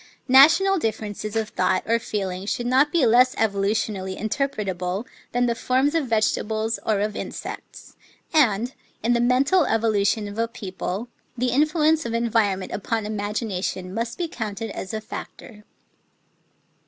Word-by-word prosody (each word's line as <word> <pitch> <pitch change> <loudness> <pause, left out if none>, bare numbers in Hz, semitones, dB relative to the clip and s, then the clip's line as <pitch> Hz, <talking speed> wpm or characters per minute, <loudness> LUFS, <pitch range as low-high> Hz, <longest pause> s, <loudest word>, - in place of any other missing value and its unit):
National 335 +8 +7
differences 215 -2 -3
of 220 -1 -1
thought 185 0 +1
or 230 +1 +2
feeling 195 -3 -4
should 240 - -2
not 265 +4 +3
be 330 -6 +3
less 250 +2 +5
evolutionally 200 -2 -1
interpretable 205 -6 -2 0.3
than 245 0 +1
the 235 - +1
forms 260 +5 +1
of 320 -5 0
vegetables 220 0 0
or 215 -2 +1
of 210 0 -1
insects; - - -7 0.4
and, 245 -5 +3 0.3
in 235 +2 +3
the 235 - +2
mental 275 +8 +3
evolution 215 -1 +1
of 205 +2 -7
a 230 - +1
people, 195 0 -5 0.3
the 250 +1 0
influence 310 +2 +3
of 230 -1 -3
en 230 0 0
vironment 200 -4 +1
upon 220 +1 -2
imagination 205 -3 -3
must 230 +2 -3
be 345 - -1
counted 220 -5 -5
as 190 - -6
a 220 - -3
factor. 215 -1 -9
225 Hz, 145 wpm, -23 LUFS, 205-250 Hz, 0.4 s, National